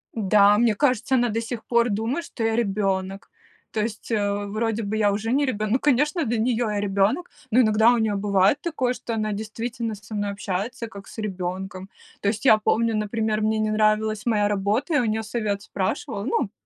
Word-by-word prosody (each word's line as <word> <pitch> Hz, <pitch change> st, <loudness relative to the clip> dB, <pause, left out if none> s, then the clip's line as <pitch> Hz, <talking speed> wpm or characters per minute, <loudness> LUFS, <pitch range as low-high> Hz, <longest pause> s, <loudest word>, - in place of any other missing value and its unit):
Да, 205 Hz, -1 st, +4 dB
мне 230 Hz, -2 st, +3 dB
кажется, 260 Hz, 0 st, +1 dB
она 245 Hz, -1 st, +2 dB
до 225 Hz, +1 st, -1 dB
сих 230 Hz, 0 st, -6 dB
пор 235 Hz, 0 st, +2 dB
думает, 230 Hz, +11 st, -2 dB
что 230 Hz, -, -6 dB
я 225 Hz, 0 st, +1 dB
ребенок. 195 Hz, -3 st, -1 dB, 0.4 s
То 215 Hz, -, -1 dB
есть, 220 Hz, +1 st, -5 dB
э, 205 Hz, -2 st, 0 dB
вроде 220 Hz, +2 st, -2 dB
бы 205 Hz, +1 st, -3 dB
я 205 Hz, -2 st, +3 dB
уже 220 Hz, +3 st, -2 dB
не 285 Hz, +2 st, +2 dB
ребенок. 215 Hz, -4 st, -2 dB
Ну, 255 Hz, -, +3 dB
конечно, 295 Hz, +5 st, +2 dB
для 235 Hz, 0 st, 0 dB
нее 235 Hz, +1 st, +1 dB
я 210 Hz, -1 st, -1 dB
ребенок, 205 Hz, -, 0 dB, 0.2 s
но 240 Hz, -, +3 dB
иногда 220 Hz, 0 st, +5 dB
у 245 Hz, -, +2 dB
нее 220 Hz, -2 st, +1 dB
бывает 200 Hz, +3 st, +2 dB
такое, 260 Hz, -7 st, -1 dB
что 230 Hz, -2 st, -5 dB
она 215 Hz, -1 st, -1 dB
действительно 225 Hz, +2 st, -4 dB
со 210 Hz, +2 st, -12 dB
мной 205 Hz, -1 st, -1 dB
общается, 200 Hz, +4 st, -4 dB
как 200 Hz, -2 st, -11 dB
с -, -, -13 dB
ребенком. 190 Hz, -2 st, -5 dB, 0.3 s
То -, -, -1 dB
есть 215 Hz, +5 st, -1 dB
я 220 Hz, -4 st, +7 dB
помню, 225 Hz, +1 st, +1 dB
например, 215 Hz, 0 st, -1 dB
мне 215 Hz, +1 st, +1 dB
не 215 Hz, 0 st, 0 dB
нравилась 215 Hz, 0 st, +1 dB
моя 210 Hz, -3 st, +2 dB
работа, 210 Hz, -, 0 dB
я 290 Hz, -, +4 dB
у -, -, 0 dB
нее 220 Hz, 0 st, -1 dB
совет 210 Hz, -3 st, -2 dB
спрашивала, 200 Hz, +1 st, -3 dB
ну, 210 Hz, -4 st, -1 dB
215 Hz, 205 wpm, -24 LUFS, 205-235 Hz, 0.4 s, я